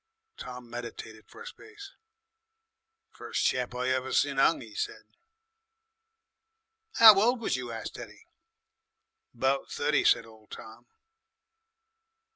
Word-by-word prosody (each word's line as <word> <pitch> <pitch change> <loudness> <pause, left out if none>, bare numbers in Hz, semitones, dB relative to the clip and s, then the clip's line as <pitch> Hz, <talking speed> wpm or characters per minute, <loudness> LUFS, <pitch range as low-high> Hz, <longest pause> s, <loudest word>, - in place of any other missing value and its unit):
Tom 125 -1 -10
meditated 115 -2 -9
for 460 - -13
a - - -13
space. 425 -4 -12 1.2
"First - - -4
chap 125 -1 -1
I 125 +1 -2
ever 130 0 -2
sin 140 -1 +1
'ung!" 150 - +3
he 110 -2 -12
said. - - -5 2.0
"Ow 215 -3 +9
old 240 +3 +2
was 230 - -2
you?" 125 -2 -6
asked 115 -1 -7
Teddy. - - -12 1.1
"'Bout 135 +3 -1
thirty," - - 0
said - - +3
old 110 -1 -19
Tom. 110 0 -12
130 Hz, 115 wpm, -28 LUFS, -, 2.0 s, Ow